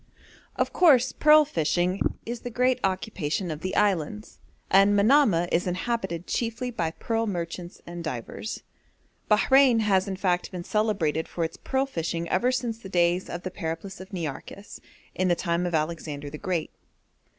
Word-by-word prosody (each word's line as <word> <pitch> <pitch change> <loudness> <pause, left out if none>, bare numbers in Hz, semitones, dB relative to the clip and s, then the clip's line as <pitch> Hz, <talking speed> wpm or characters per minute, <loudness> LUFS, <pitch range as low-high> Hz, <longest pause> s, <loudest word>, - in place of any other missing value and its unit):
Of - - -1
course 265 -8 +5
pearl 305 0 +6
fishing 175 - 0 0.3
is 235 +1 -4
the 245 - -6
great 250 +2 +1
occupation 185 -3 -2
of 155 0 -6
the 185 +2 -3
islands, 205 +1 0 0.3
and 195 +2 +5
Manamah 205 - +4
is 175 +2 +1
inhabited 185 -2 -2
chiefly 235 +1 -2
by 170 -8 -1
pearl 225 +6 -2
merchants 175 -2 -5
and 175 0 -7
divers. 155 - -5 0.7
Bahrein 250 +2 +5
has 195 -2 +2
in 195 - -3
fact 180 -2 0
been 180 -2 -5
celebrated 190 -7 0
for 170 - -3
its 160 - -4
pearl 265 0 -1
fishing 170 -8 -3
ever 240 +7 +2
since 240 -3 -2
the 195 - -10
days 175 0 +1
of 175 +1 -5
the 185 - -4
Periplus 185 +2 -5
of 185 - -11
Nearchus, 175 +3 -6 0.3
in 185 - 0
the 175 - +3
time 170 +1 -1
of 175 - -1
Alexander 155 -2 -3
the 150 - -8
Great. 180 -5 -2
185 Hz, 160 wpm, -26 LUFS, 170-225 Hz, 0.7 s, pearl